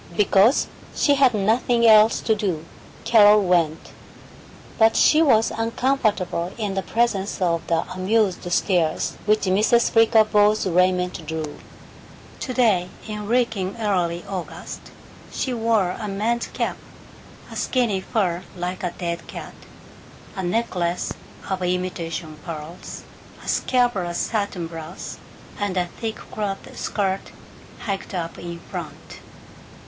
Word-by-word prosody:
Because 210 Hz, +5 st, +4 dB, 0.3 s
she 285 Hz, -, +3 dB
had 270 Hz, -4 st, +4 dB
nothing 235 Hz, +3 st, +2 dB
else 220 Hz, 0 st, +6 dB
to 220 Hz, -, +2 dB
do, 185 Hz, -7 st, -2 dB, 0.4 s
Carol 210 Hz, -2 st, +6 dB
went. 170 Hz, -4 st, +1 dB, 0.9 s
But 225 Hz, 0 st, +5 dB
she 310 Hz, -, +5 dB
was 225 Hz, -8 st, +4 dB
uncomfortable 225 Hz, -7 st, 0 dB
in 210 Hz, -4 st, -2 dB
the 195 Hz, -, -1 dB
presence 215 Hz, -3 st, 0 dB
of 170 Hz, -3 st, 0 dB
the 165 Hz, -1 st, +2 dB
amused 185 Hz, -1 st, 0 dB
stares 175 Hz, -4 st, +1 dB
which 215 Hz, +1 st, +3 dB
Mrs. 210 Hz, +5 st, +3 dB
Flickerbaugh's 215 Hz, -2 st, +4 dB
raiment 180 Hz, -1 st, +1 dB
drew. 160 Hz, -2 st, -4 dB, 0.8 s
Today, 225 Hz, -9 st, +1 dB, 0.2 s
in 210 Hz, -1 st, -5 dB
reeking 220 Hz, -5 st, 0 dB
early 180 Hz, -5 st, -1 dB
August, 190 Hz, -3 st, -6 dB, 0.5 s
she 260 Hz, -, -2 dB
wore 225 Hz, -5 st, +1 dB
a 215 Hz, +2 st, -5 dB
man's 220 Hz, +4 st, -1 dB
cap, -, -, -3 dB, 0.7 s
a -, -, -8 dB
skinny 230 Hz, -7 st, 0 dB
fur 185 Hz, -5 st, -1 dB, 0.2 s
like 180 Hz, +2 st, -4 dB
a 180 Hz, -2 st, -3 dB
dead 170 Hz, -1 st, -4 dB
cat, -, -, -8 dB, 0.8 s
a 190 Hz, -, -3 dB
necklace 180 Hz, -3 st, -1 dB, 0.3 s
of 190 Hz, -1 st, -2 dB
imitation 175 Hz, -3 st, -3 dB
pearls, 165 Hz, +1 st, -8 dB, 0.4 s
a -, -, -11 dB
scabrous 225 Hz, -9 st, +1 dB
satin 200 Hz, -5 st, -2 dB
blouse, 165 Hz, +2 st, -8 dB, 0.4 s
and 200 Hz, -2 st, -1 dB
a 180 Hz, -, +2 dB
thick 220 Hz, +5 st, -5 dB, 0.2 s
cloth 200 Hz, -2 st, -4 dB
skirt 195 Hz, -2 st, -2 dB, 0.5 s
hiked 195 Hz, -2 st, -4 dB
up 165 Hz, -2 st, -4 dB
in 170 Hz, 0 st, -6 dB
front. -, -, -8 dB
195 Hz, 120 wpm, -23 LUFS, 175-225 Hz, 0.9 s, else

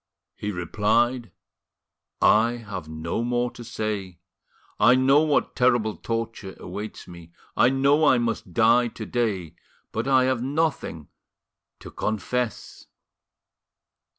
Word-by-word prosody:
He 105 Hz, -, -4 dB
replied: 110 Hz, +7 st, 0 dB, 0.9 s
"I 115 Hz, +3 st, +5 dB
have 100 Hz, -9 st, -7 dB
no 80 Hz, +6 st, -3 dB
more 120 Hz, 0 st, 0 dB
to 120 Hz, -, -11 dB
say. 105 Hz, -5 st, -4 dB, 0.6 s
I 115 Hz, +4 st, +6 dB
know 135 Hz, +3 st, +4 dB
what 155 Hz, -2 st, +1 dB
terrible 120 Hz, -4 st, +2 dB
torture 115 Hz, -4 st, -4 dB
awaits 105 Hz, +1 st, -7 dB
me, 85 Hz, -1 st, -13 dB, 0.2 s
I 125 Hz, -, +5 dB
know 140 Hz, +3 st, +3 dB
I 130 Hz, -, +5 dB
must 115 Hz, -5 st, -2 dB
die 120 Hz, +5 st, +4 dB
to 110 Hz, -1 st, -8 dB
day, 100 Hz, -10 st, -2 dB, 0.4 s
but 115 Hz, +4 st, -3 dB
I 130 Hz, -1 st, +4 dB
have 130 Hz, -2 st, 0 dB
nothing 140 Hz, -, -2 dB, 0.7 s
to -, -, -10 dB
confess." 110 Hz, +2 st, -3 dB
115 Hz, 120 wpm, -24 LUFS, 105-125 Hz, 0.9 s, I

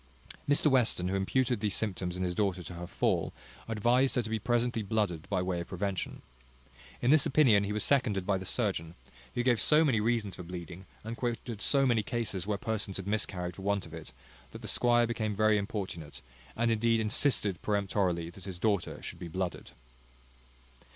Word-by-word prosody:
Mr 145 Hz, -, +4 dB
Western, 125 Hz, -10 st, +3 dB
who 95 Hz, -, -1 dB
imputed 120 Hz, +5 st, +1 dB
these 105 Hz, -1 st, 0 dB
symptoms 90 Hz, -4 st, -2 dB
in 95 Hz, -, -2 dB
his 90 Hz, -1 st, -1 dB
daughter 95 Hz, -2 st, 0 dB
to 90 Hz, -, -8 dB
her 85 Hz, 0 st, -7 dB
fall, -, -, 0 dB, 0.4 s
advised 120 Hz, +4 st, +2 dB
her 125 Hz, -, +1 dB
to 110 Hz, -, -6 dB
be 110 Hz, -, 0 dB
presently 120 Hz, +1 st, 0 dB
blooded 100 Hz, -6 st, -1 dB
by 95 Hz, -3 st, 0 dB
way 90 Hz, -1 st, -1 dB
of 85 Hz, -, -7 dB
prevention. 95 Hz, 0 st, -3 dB, 0.8 s
In 125 Hz, -, +4 dB
this 155 Hz, -2 st, +5 dB
opinion 120 Hz, -9 st, +4 dB
he 100 Hz, -, -3 dB
was 105 Hz, 0 st, +1 dB
seconded 110 Hz, -9 st, +1 dB
by 100 Hz, -1 st, +1 dB
the 95 Hz, -, -7 dB
surgeon, 95 Hz, -7 st, -1 dB, 0.4 s
who 120 Hz, -, 0 dB
gave 120 Hz, -4 st, +3 dB
so 155 Hz, +5 st, +5 dB
many 120 Hz, -7 st, +2 dB
reasons 110 Hz, -4 st, 0 dB
for -, -, -6 dB
bleeding, 90 Hz, +1 st, -8 dB, 0.2 s
and 115 Hz, +2 st, -5 dB
quoted 120 Hz, -2 st, -4 dB
so 140 Hz, -1 st, +3 dB
many 120 Hz, -4 st, +3 dB
cases 105 Hz, -4 st, -2 dB
where 105 Hz, -1 st, 0 dB
persons 110 Hz, -2 st, -1 dB
had 95 Hz, -, -6 dB
miscarried 95 Hz, -4 st, -1 dB
for -, -, -8 dB
want 100 Hz, 0 st, 0 dB
of 80 Hz, -, -12 dB
it, 80 Hz, -5 st, -9 dB, 0.4 s
that -, -, -9 dB
the -, -, -5 dB
squire 120 Hz, -1 st, +3 dB
became 110 Hz, -3 st, -2 dB
very 110 Hz, 0 st, +3 dB
importunate, 95 Hz, -, -5 dB, 0.3 s
and 115 Hz, 0 st, +1 dB
indeed 115 Hz, +1 st, +2 dB
insisted 110 Hz, -, +1 dB
peremptorily 95 Hz, -5 st, 0 dB
that 95 Hz, +1 st, -12 dB
his 95 Hz, -3 st, -6 dB
daughter 100 Hz, -1 st, -1 dB
should -, -, -6 dB
be 85 Hz, -, -6 dB
blooded. 90 Hz, +1 st, -4 dB
105 Hz, 190 wpm, -30 LUFS, 90-115 Hz, 0.8 s, this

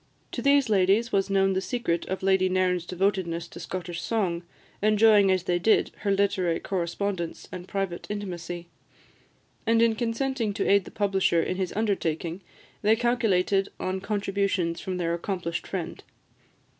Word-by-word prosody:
To -, -, -4 dB
these 280 Hz, -1 st, +4 dB
ladies 205 Hz, +3 st, +3 dB
was 195 Hz, 0 st, +1 dB
known 195 Hz, -1 st, +3 dB
the 190 Hz, -, 0 dB
secret 235 Hz, -7 st, -2 dB
of 190 Hz, 0 st, -4 dB
Lady 190 Hz, -1 st, +3 dB
Nairn's 180 Hz, -2 st, +1 dB
devotedness 180 Hz, -3 st, -1 dB
to -, -, -10 dB
Scottish 175 Hz, -2 st, -5 dB
song, 185 Hz, -7 st, -1 dB, 0.4 s
enjoying 210 Hz, -1 st, +5 dB
as 185 Hz, -2 st, +2 dB
they 175 Hz, -1 st, 0 dB
did 220 Hz, +5 st, +3 dB
her 205 Hz, -, -3 dB
literary 195 Hz, -4 st, +1 dB
correspondence 180 Hz, -1 st, -3 dB
and 180 Hz, 0 st, -7 dB
private 195 Hz, -3 st, -3 dB
intimacy; 175 Hz, -4 st, -5 dB, 1.0 s
and 225 Hz, 0 st, +4 dB
in 230 Hz, -1 st, +4 dB
consenting 230 Hz, -1 st, -1 dB
to -, -, -1 dB
aid 200 Hz, -2 st, +4 dB
the -, -, -9 dB
publisher 190 Hz, -5 st, +1 dB
in 185 Hz, -, -2 dB
his 190 Hz, -2 st, -2 dB
undertaking, 180 Hz, -5 st, -1 dB, 0.4 s
they 215 Hz, +1 st, +4 dB
calculated 210 Hz, -5 st, +1 dB
on 185 Hz, 0 st, -2 dB
contributions 195 Hz, -4 st, -1 dB
from 185 Hz, -1 st, -3 dB
their 170 Hz, -1 st, 0 dB
accomplished 170 Hz, -1 st, -3 dB
friend. -, -, -5 dB
195 Hz, 150 wpm, -26 LUFS, 180-210 Hz, 1.0 s, enjoying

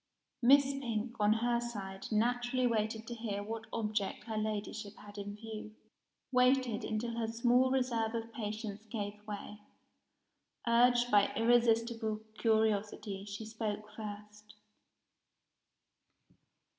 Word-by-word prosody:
Miss 275 Hz, +4 st, +7 dB
Pink, 240 Hz, -4 st, -2 dB
on 210 Hz, 0 st, +4 dB
her 240 Hz, -1 st, +3 dB
side, 195 Hz, -5 st, -5 dB
naturally 245 Hz, +3 st, +2 dB
waited 220 Hz, -1 st, 0 dB
to 240 Hz, -, -5 dB
hear 215 Hz, -3 st, -3 dB
what 225 Hz, +1 st, -5 dB
object 210 Hz, -3 st, -1 dB
her 225 Hz, -2 st, -5 dB
Ladyship 215 Hz, -1 st, -3 dB
had 205 Hz, 0 st, -11 dB
in 205 Hz, 0 st, -5 dB
view 215 Hz, 0 st, -8 dB, 0.6 s
waited, 250 Hz, -3 st, +3 dB
until 230 Hz, +2 st, -2 dB
her 225 Hz, -, 0 dB
small 240 Hz, +3 st, +3 dB
reserve 240 Hz, -4 st, +1 dB
of 230 Hz, 0 st, -4 dB
patience 215 Hz, -1 st, -4 dB
gave 210 Hz, -1 st, -5 dB
way. 210 Hz, 0 st, -6 dB, 1.1 s
Urged 245 Hz, +1 st, +5 dB
by 205 Hz, -1 st, +5 dB
irresistible 230 Hz, -1 st, +2 dB
curiosity, 215 Hz, -3 st, +1 dB
she 205 Hz, +2 st, -6 dB
spoke 215 Hz, -1 st, -4 dB
first. 210 Hz, 0 st, -8 dB
220 Hz, 115 wpm, -33 LUFS, 210-235 Hz, 1.1 s, Miss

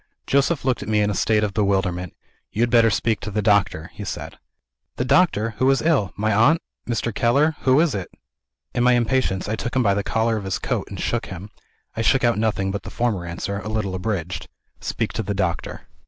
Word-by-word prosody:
Joseph 140 Hz, +1 st, +1 dB
looked 130 Hz, -2 st, +1 dB
at -, -, -6 dB
me 105 Hz, -1 st, +3 dB
in 105 Hz, 0 st, +1 dB
a -, -, -1 dB
state 105 Hz, +3 st, +2 dB
of 100 Hz, -2 st, -1 dB
bewilderment. 95 Hz, -4 st, 0 dB, 0.4 s
"You 115 Hz, -, 0 dB
had 120 Hz, -, 0 dB
better 115 Hz, -2 st, +6 dB
speak 110 Hz, +1 st, 0 dB
to -, -, -5 dB
the 105 Hz, +1 st, -2 dB
doctor," 100 Hz, -5 st, +2 dB
he 105 Hz, -, -7 dB
said. 100 Hz, -, -6 dB, 0.6 s
"The 125 Hz, -, -1 dB
doctor! 130 Hz, -, +3 dB
Who 130 Hz, +2 st, +4 dB
is 135 Hz, -, +3 dB
ill? 145 Hz, -, +2 dB
My 110 Hz, +1 st, 0 dB
aunt? 120 Hz, +11 st, +4 dB, 0.3 s
Mr. 115 Hz, -1 st, -1 dB
Keller? 140 Hz, +9 st, +2 dB
Who 130 Hz, +2 st, +5 dB
is 160 Hz, -4 st, +3 dB
it?" 95 Hz, -3 st, -4 dB, 0.6 s
In 120 Hz, -, +1 dB
my 125 Hz, 0 st, +5 dB
impatience, 120 Hz, -6 st, +1 dB
I 110 Hz, -, -1 dB
took 120 Hz, +3 st, -4 dB
him 130 Hz, -, +3 dB
by 100 Hz, -3 st, +3 dB
the 100 Hz, -, 0 dB
collar 115 Hz, +2 st, 0 dB
of 100 Hz, -, -5 dB
his 95 Hz, -, -1 dB
coat, -, -, -2 dB
and -, -, -7 dB
shook -, -, -1 dB
him. 95 Hz, +3 st, -8 dB, 0.4 s
I 115 Hz, -, -1 dB
shook 130 Hz, +3 st, +3 dB
out 120 Hz, -3 st, +3 dB
nothing 105 Hz, -3 st, 0 dB
but 100 Hz, -, -3 dB
the -, -, -8 dB
former 105 Hz, -8 st, -1 dB
answer, 95 Hz, +4 st, -4 dB
a 105 Hz, -, -6 dB
little 105 Hz, -3 st, -2 dB
abridged: 95 Hz, -2 st, -3 dB, 0.3 s
"Speak -, -, -3 dB
to -, -, -2 dB
the 100 Hz, -1 st, -3 dB
doctor." 95 Hz, -4 st, -2 dB
110 Hz, 225 wpm, -22 LUFS, 100-120 Hz, 0.6 s, better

